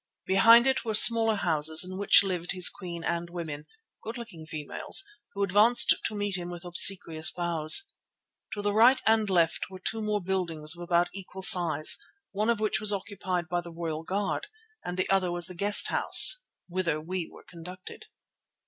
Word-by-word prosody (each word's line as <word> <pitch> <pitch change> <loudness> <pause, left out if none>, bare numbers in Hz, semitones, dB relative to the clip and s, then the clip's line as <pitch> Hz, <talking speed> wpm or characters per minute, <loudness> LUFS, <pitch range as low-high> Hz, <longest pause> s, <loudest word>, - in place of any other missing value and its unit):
Behind 230 +5 +4
it 265 0 -1
were 220 -2 -4
smaller 225 0 +6
houses 160 -3 +2
in 185 - -9
which 200 +1 +3
lived 180 -2 -5
his 180 -2 +4
queen 170 -3 -10
and 170 0 -5
women, 160 -4 -9 0.3
good 225 +3 -9
looking 180 -10 -12
females, 155 - -2 0.3
who 200 - -4
advanced 210 +5 +4
to 215 - -3
meet 205 -2 -4
him 175 0 -8
with 175 0 -11
obsequious 175 -2 +2
bows. 170 - 0 0.6
To 205 - -7
the 205 0 -2
right 245 +5 +3
and 220 -2 0
left 170 -2 -1
were 190 - -12
two 220 +4 -4
more 210 -1 -3
buildings 175 -4 -3
of 175 - -13
about 175 0 -1
equal 190 0 -11
size, 165 -5 +3 0.3
one 210 +3 -3
of 235 -2 -1
which 215 -1 -2
was 215 -1 +4
occupied 190 -3 -6
by 175 0 -4
the 170 0 -13
royal 165 -2 -7
guard 200 - -5 0.4
and 180 0 -8
the 185 - -3
other 190 -2 -1
was 175 -1 -1
the 180 - -9
guest 205 +4 +4
house - - +5 0.3
whither 175 -4 -4
we 175 +2 -7
were - - -18
conducted. 180 +2 -13
185 Hz, 180 wpm, -25 LUFS, 170-205 Hz, 0.6 s, smaller